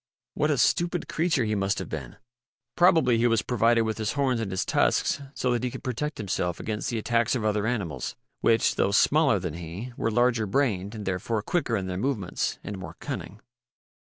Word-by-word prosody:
What 150 Hz, -, +1 dB
a 145 Hz, -, +2 dB
stupid 175 Hz, +6 st, +1 dB
creature 160 Hz, -5 st, +1 dB
he 110 Hz, -, 0 dB
must 100 Hz, 0 st, 0 dB
have 95 Hz, -, -4 dB
been! 65 Hz, -6 st, -6 dB, 0.6 s
Probably 160 Hz, -9 st, +4 dB
he 120 Hz, -, +4 dB
was 115 Hz, -4 st, +2 dB
provided 115 Hz, -1 st, +3 dB
with 110 Hz, 0 st, -2 dB
his 110 Hz, 0 st, -1 dB
horns 135 Hz, -4 st, +1 dB
and 110 Hz, -, -3 dB
his 95 Hz, -1 st, -1 dB
tusks -, -, +1 dB
so 125 Hz, -, 0 dB
that 120 Hz, -1 st, 0 dB
he 125 Hz, -, 0 dB
could -, -, -9 dB
protect 145 Hz, +5 st, -3 dB
himself 90 Hz, -4 st, -2 dB
against 105 Hz, -1 st, -3 dB
the 120 Hz, -, -2 dB
attacks 115 Hz, +2 st, +1 dB
of 115 Hz, -4 st, -2 dB
other 105 Hz, 0 st, +1 dB
animals, 95 Hz, -, -3 dB, 0.2 s
which, 115 Hz, -1 st, +3 dB
though -, -, +3 dB
smaller 140 Hz, +4 st, +4 dB
than 90 Hz, -4 st, -4 dB
he, 90 Hz, +9 st, -7 dB
were -, -, 0 dB
larger 120 Hz, -1 st, +2 dB
brained 105 Hz, -3 st, 0 dB
and 105 Hz, -2 st, -6 dB
therefore 100 Hz, +4 st, -1 dB
quicker 120 Hz, -5 st, 0 dB
in 95 Hz, -, -3 dB
their 90 Hz, -1 st, -3 dB
movements, 105 Hz, -5 st, -1 dB
and, 100 Hz, -2 st, -6 dB
more 90 Hz, -, -8 dB
cunning. 105 Hz, +5 st, -6 dB
110 Hz, 200 wpm, -26 LUFS, 100-125 Hz, 0.6 s, Probably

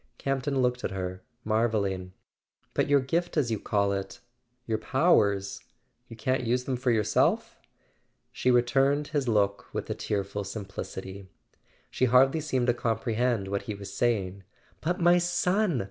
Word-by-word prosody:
" -, -, -45 dB
Campton 135 Hz, 0 st, -1 dB
looked 125 Hz, 0 st, 0 dB
at -, -, -1 dB
her, 95 Hz, -1 st, -5 dB, 0.2 s
marvelling. 105 Hz, -4 st, 0 dB, 0.6 s
"But -, -, +1 dB
your 140 Hz, -1 st, +4 dB
gift 170 Hz, +6 st, -1 dB
as 130 Hz, -6 st, +1 dB
you 110 Hz, -, -1 dB
call 100 Hz, -1 st, +1 dB
it... 100 Hz, +5 st, -5 dB, 0.5 s
your 110 Hz, -1 st, -1 dB
powers... 100 Hz, -, +2 dB, 0.5 s
you 115 Hz, -, -10 dB
can't 130 Hz, +3 st, -1 dB
use 125 Hz, +2 st, 0 dB
them 130 Hz, 0 st, -2 dB
for 125 Hz, +1 st, -1 dB
yourself? 105 Hz, -3 st, +1 dB, 0.4 s
" -, -, -42 dB, 0.3 s
She 130 Hz, -, 0 dB
returned 135 Hz, +4 st, +3 dB
his 145 Hz, -4 st, -1 dB
look 100 Hz, -3 st, +1 dB
with -, -, -3 dB
a -, -, +1 dB
tearful 100 Hz, 0 st, -3 dB
simplicity: 100 Hz, -1 st, -7 dB, 0.6 s
she 130 Hz, -, +1 dB
hardly 135 Hz, +5 st, +4 dB
seemed 130 Hz, -5 st, 0 dB
to 120 Hz, -, +3 dB
comprehend 115 Hz, -2 st, 0 dB
what 100 Hz, +1 st, -2 dB
he 105 Hz, -, -2 dB
was 100 Hz, -1 st, -9 dB
saying. 100 Hz, -4 st, 0 dB, 0.4 s
"But 175 Hz, +3 st, -1 dB
my 175 Hz, +1 st, +5 dB
son! 175 Hz, -, +1 dB
120 Hz, 160 wpm, -28 LUFS, 100-135 Hz, 0.6 s, my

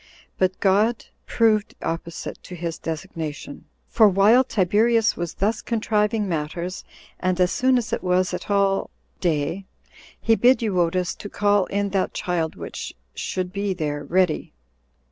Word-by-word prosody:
But 185 Hz, 0 st, +1 dB
God 210 Hz, +4 st, +2 dB, 0.2 s
proved 220 Hz, -2 st, +2 dB
opposite 165 Hz, 0 st, -5 dB
to 180 Hz, -, -9 dB
his 170 Hz, -1 st, -4 dB
designation; 160 Hz, -3 st, -6 dB, 0.2 s
for 220 Hz, -3 st, +5 dB
while 205 Hz, +7 st, +5 dB
Tiberius 225 Hz, +1 st, +2 dB
was 170 Hz, -1 st, -4 dB
thus 215 Hz, +3 st, 0 dB
contriving 215 Hz, -2 st, 0 dB
matters, 170 Hz, +2 st, -3 dB, 0.4 s
and 185 Hz, 0 st, 0 dB
as 180 Hz, 0 st, +3 dB
soon 255 Hz, 0 st, +3 dB
as 235 Hz, -2 st, -2 dB
it -, -, -1 dB
was 180 Hz, 0 st, +1 dB
at 180 Hz, -, -5 dB
all 200 Hz, -1 st, +2 dB, 0.3 s
day, 170 Hz, +3 st, -1 dB, 0.5 s
he 225 Hz, -, +3 dB
bid 245 Hz, +2 st, +4 dB
Euodus 180 Hz, -3 st, +1 dB
to 205 Hz, -, -7 dB
call 205 Hz, -2 st, +2 dB
in 200 Hz, 0 st, -1 dB
that 190 Hz, -1 st, -1 dB
child 170 Hz, -3 st, -1 dB
which -, -, -7 dB, 0.2 s
should 185 Hz, -1 st, -3 dB
be 200 Hz, -1 st, -1 dB
there 145 Hz, -3 st, -3 dB
ready. 180 Hz, -2 st, 0 dB
190 Hz, 145 wpm, -23 LUFS, 175-210 Hz, 0.5 s, for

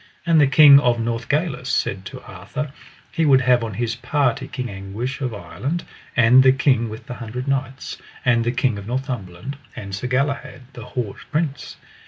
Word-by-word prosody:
And 165 Hz, -3 st, +5 dB
the 140 Hz, -, +5 dB
King 140 Hz, 0 st, +8 dB
of 120 Hz, -3 st, +2 dB
Northgalis 125 Hz, +4 st, -1 dB
said 95 Hz, -5 st, -1 dB
to -, -, -9 dB
Arthur, 150 Hz, -1 st, -6 dB, 0.4 s
he 165 Hz, -, 0 dB
would 135 Hz, -4 st, +5 dB
have 125 Hz, -1 st, +3 dB
on 110 Hz, -4 st, -4 dB
his 120 Hz, +1 st, -1 dB
party 135 Hz, 0 st, 0 dB
King 125 Hz, -2 st, -4 dB
Anguish 105 Hz, +7 st, -5 dB
of 130 Hz, -3 st, -1 dB
Ireland, 140 Hz, +9 st, -4 dB, 0.3 s
and 125 Hz, +2 st, +7 dB
the 130 Hz, 0 st, +6 dB
King 130 Hz, -4 st, +2 dB
with 110 Hz, +1 st, -9 dB
the -, -, -6 dB
Hundred 125 Hz, +2 st, -6 dB
Knights, 135 Hz, -1 st, -3 dB, 0.3 s
and 120 Hz, -2 st, +3 dB
the 120 Hz, -, 0 dB
King 125 Hz, -4 st, 0 dB
of 100 Hz, -, -9 dB
Northumberland, 125 Hz, -2 st, -4 dB, 0.2 s
and 100 Hz, -1 st, -7 dB
Sir 100 Hz, +6 st, -3 dB
Galahad, 130 Hz, 0 st, -1 dB
the 115 Hz, -, -9 dB
haut 115 Hz, -6 st, -4 dB
prince. 150 Hz, -2 st, -2 dB
125 Hz, 180 wpm, -22 LUFS, 115-140 Hz, 0.4 s, King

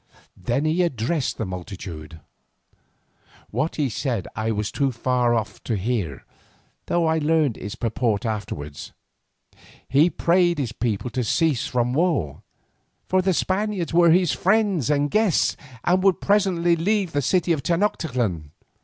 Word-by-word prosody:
Then 130 Hz, +5 st, -1 dB
he 160 Hz, +3 st, +2 dB
addressed 140 Hz, -2 st, -1 dB
the 110 Hz, -, -2 dB
multitude. 90 Hz, -4 st, -8 dB, 1.3 s
What 160 Hz, -, -1 dB
he 150 Hz, -3 st, 0 dB
said 120 Hz, -3 st, -2 dB
I 110 Hz, +1 st, -2 dB
was 105 Hz, -2 st, -2 dB
too 140 Hz, -2 st, 0 dB
far 125 Hz, 0 st, +1 dB
off 110 Hz, -2 st, -3 dB
to 115 Hz, -, -1 dB
hear, 95 Hz, -, -3 dB, 0.6 s
though 175 Hz, -1 st, +1 dB
I 160 Hz, 0 st, +2 dB
learned 155 Hz, -5 st, +2 dB
its 100 Hz, -, -7 dB
purport 115 Hz, -3 st, -1 dB
afterwards. 90 Hz, -10 st, -5 dB, 0.9 s
He 150 Hz, +6 st, +4 dB
prayed 175 Hz, 0 st, +2 dB
his 130 Hz, -6 st, -2 dB
people 115 Hz, 0 st, -2 dB
to 125 Hz, +2 st, -1 dB
cease 150 Hz, +3 st, +1 dB
from 125 Hz, 0 st, 0 dB
war, 150 Hz, -, 0 dB, 0.6 s
for 185 Hz, 0 st, +2 dB
the 190 Hz, +1 st, +1 dB
Spaniards 190 Hz, -1 st, -1 dB
were 170 Hz, 0 st, +5 dB
his 175 Hz, +1 st, +4 dB
friends 195 Hz, -, +1 dB
and 145 Hz, -1 st, +1 dB
guests 215 Hz, -6 st, +2 dB, 0.3 s
and 185 Hz, +1 st, +2 dB
would 195 Hz, -1 st, +3 dB
presently 185 Hz, -4 st, +2 dB
leave 190 Hz, +2 st, 0 dB
the 145 Hz, -, 0 dB
city 175 Hz, +5 st, +1 dB
of 155 Hz, -4 st, +1 dB
Tenoctitlan. 125 Hz, -, -1 dB
145 Hz, 145 wpm, -23 LUFS, 115-175 Hz, 1.3 s, were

